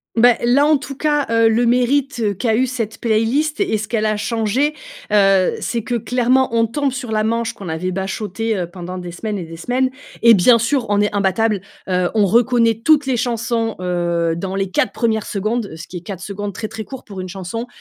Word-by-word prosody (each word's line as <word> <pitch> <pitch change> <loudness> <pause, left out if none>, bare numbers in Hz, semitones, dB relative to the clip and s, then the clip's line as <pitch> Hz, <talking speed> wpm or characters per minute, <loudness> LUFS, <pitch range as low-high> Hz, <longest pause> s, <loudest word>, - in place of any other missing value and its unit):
Beh, 240 +1 +6
là, 250 +4 +4
en 305 0 +4
tout 275 0 -8
cas, 295 -1 0
heu, 230 0 +4
le 235 +2 +2
mérite 245 -3 +1
qu'a 225 -3 +1
eu 255 +3 +2
cette 235 -4 -4
playlist 240 - +1
et 370 - +1
ce 215 0 -5
qu'elle 215 -1 0
a 215 - 0
changé, 230 +6 0 0.4
heu, 195 -2 +4
c'est 230 -3 -2
que 245 - -4
clairement 250 +3 +2
on 230 0 +4
tombe 275 +4 -1
sur 245 -3 -5
la 215 0 +1
manche 230 +1 -1
qu'on 195 -4 -8
avait 165 +3 -2
bachoté, 200 +3 -3
heu, 175 - -2
pendant 180 +1 -7
des 175 -1 -6
semaines 210 +3 -4
et 180 - -4
des 165 0 -9
semaines 255 +9 0 0.3
et 235 -1 +8
bien 230 +5 +6
sûr, 235 +2 0
on 205 0 +2
est 210 0 +1
imbattables, 200 +1 +1 0.3
heu, 180 -1 +1
on 210 -2 +4
reconnaît 230 +1 +3
toutes 305 -2 +4
les 260 -2 0
chansons, 230 -2 -1
heu, 170 -2 0
dans 190 +2 -4
les 195 -1 -2
4 - - +1
1res 220 -2 0
secondes, 215 -2 -2
ce 160 -1 -9
qui 180 - -7
est, - - -8
4 185 0 -7
secondes 205 0 -5
très, 215 - -4
très 220 0 -7
court 260 +5 -9
pour 195 -3 -7
une 185 - -6
chanson, 195 +6 -5
225 Hz, 220 wpm, -19 LUFS, 195-245 Hz, 0.4 s, et